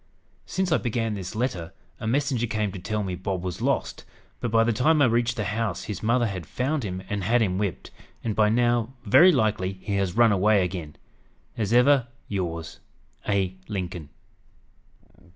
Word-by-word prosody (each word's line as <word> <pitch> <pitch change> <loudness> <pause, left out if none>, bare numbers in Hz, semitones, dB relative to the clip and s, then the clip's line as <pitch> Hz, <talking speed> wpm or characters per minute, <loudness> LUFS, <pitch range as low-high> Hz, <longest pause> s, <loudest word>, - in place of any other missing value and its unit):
"Since 190 -2 -1
I 160 - +5
began 115 -2 -1
this 95 -2 -6
letter, 105 -9 -2 0.3
a 110 - -4
messenger 130 -1 +1
came 105 -2 -1
to 95 - -7
tell 105 +3 -2
me 95 -2 -3
Bob 90 0 -3
was 90 -1 -4
lost; - - -1 0.4
but 120 - -2
by 115 +1 +4
the 115 0 +1
time 155 +7 +3
I 145 - +6
reached 120 0 +1
the 105 - -1
house 105 0 -2
his 100 -3 -5
mother 120 +2 +2
had 95 -6 -4
found 140 +2 -1
him 95 -2 -4
and 100 -1 -3
had 120 +6 +3
him 95 -4 +1
whipped, 100 -4 -3 0.3
and 110 -3 -2
by 105 -1 +4
now 120 +1 +1
very 175 - +7
likely 105 - +1
he 100 +1 -3
has 95 +1 -1
run 120 -2 +6
away 100 0 +3
again! 85 -4 -5 0.6
"As 105 -2 -2
ever 125 +1 +5 0.2
yours, 85 -4 -4 0.5
"A. 95 -2 +1
LINCOLN." 90 -7 -5
105 Hz, 180 wpm, -25 LUFS, 95-120 Hz, 0.6 s, very